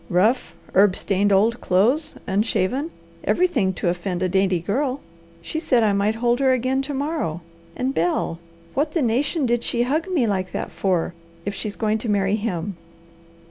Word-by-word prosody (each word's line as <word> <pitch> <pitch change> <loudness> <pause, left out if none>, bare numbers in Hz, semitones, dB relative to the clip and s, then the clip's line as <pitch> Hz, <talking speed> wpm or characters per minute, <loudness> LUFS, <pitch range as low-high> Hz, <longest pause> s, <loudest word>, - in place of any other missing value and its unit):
Rough, 215 +8 +2 0.2
herb 195 0 +5
stained 200 +1 +1
old 220 +5 +3
clothes, 255 - +2
unshaven, 215 - 0 0.3
everything 285 - +2
to - - -2
offend 180 +1 -1
a 185 - +1
dainty 190 0 +2
girl. 255 - -1 0.4
She 315 - -3
said 250 -7 +2
I 210 -2 +3
might 200 +2 +1
hold 240 +2 +1
her 265 -1 +4
again 255 +2 +1
to 280 +2 -4
morrow. 280 - -2 0.3
And, 260 +1 -1
Bel, 165 -2 0 0.3
what 300 +3 0
the 325 - +1
nation 270 +6 +1
did 240 -1 +1
she 240 0 +1
hug 305 +8 0
me 340 -10 +1
like 185 -4 -1
that - - -3
for, 180 -3 0 0.3
if 205 - -2
she's 205 0 -4
going 220 -1 0
to 225 - -4
marry 200 0 +2
him? 200 -4 -3
220 Hz, 175 wpm, -23 LUFS, 190-265 Hz, 0.4 s, herb